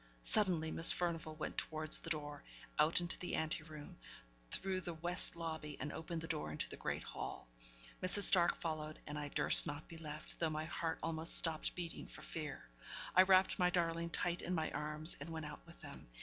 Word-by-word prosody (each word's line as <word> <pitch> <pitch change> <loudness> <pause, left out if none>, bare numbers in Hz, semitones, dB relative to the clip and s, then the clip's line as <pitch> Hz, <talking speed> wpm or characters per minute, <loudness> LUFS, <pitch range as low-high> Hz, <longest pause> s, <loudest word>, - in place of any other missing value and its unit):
Suddenly 175 -7 +1
Miss 165 - +4
Furnivall 165 -3 -3
went 155 - -4
towards 155 0 +1
the - - -8
door, 145 -2 -5 0.4
out 155 +3 +4
into 175 0 -2
the 180 - -3
ante 160 0 -2
room, 155 -2 -11 0.5
through 190 - -3
the 175 -2 -6
west 175 +2 0
lobby, 160 -3 -6
and 150 - -5
opened 165 0 -5
the 165 - -6
door 75 - -3
into 75 - -2
the - - -9
great - - -4
hall. - - -7 0.5
Mrs. 185 +2 +5
Stark 175 -4 +8
followed, 155 -2 -5
and 150 +1 -6
I 145 - -5
durst - - +5
not 145 +1 -6
be 165 - -11
left, 155 -1 -7
though 165 - 0
my 155 0 -4
heart 165 -1 -3
almost 165 0 +6
stopped 160 -2 +2
beating 175 -2 -6
for - - -12
fear. 155 -3 -7 0.5
I 185 - +9
wrapped 190 +1 +4
my 180 -1 +3
darling 170 -1 -1
tight 175 +1 -2
in 180 - -3
my 160 -1 -2
arms, 150 +2 +1
and 145 +3 -8
went 160 -1 -6
out 150 0 -9
with 170 - -16
them. - - -11
160 Hz, 200 wpm, -37 LUFS, 155-175 Hz, 0.5 s, I